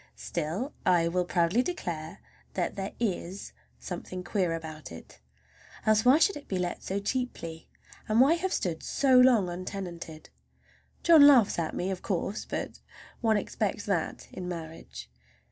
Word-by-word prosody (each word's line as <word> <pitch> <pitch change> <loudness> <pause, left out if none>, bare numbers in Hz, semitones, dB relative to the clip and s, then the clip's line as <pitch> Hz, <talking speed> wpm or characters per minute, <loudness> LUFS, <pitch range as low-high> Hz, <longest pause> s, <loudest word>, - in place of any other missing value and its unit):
Still 195 - -3
I 175 -2 +3
will 180 +1 0
proudly 175 +6 +2
declare 175 - -5 0.3
that 180 -2 -1
there 195 0 -4
is 195 -4 -3 0.2
something 185 0 -6
queer 180 -2 0
about 155 - -8
it. 85 - -12 0.7
Else, 215 0 +4
why 260 +4 +7
should 390 +5 +3
it 290 - -9
be 190 - -2
let 180 -1 -2
so 195 +1 -2
cheaply? 200 -8 -4 0.4
And 215 +2 +3
why 270 +5 +6
have 360 +2 -1
stood 170 -3 -1
so 265 -2 +3
long 245 -7 +5
untenanted? 175 - -7 0.7
John 320 -4 +8
laughs 245 -11 +5
at 160 -2 -2
me, 185 +2 -1
of 185 - -4
course, 195 +1 -2
but - - -5 0.4
one 220 -2 +2
expects 205 0 -2
that 180 -6 -2
in 180 -1 -6
marriage. 165 -2 -8
190 Hz, 150 wpm, -29 LUFS, 170-235 Hz, 0.7 s, John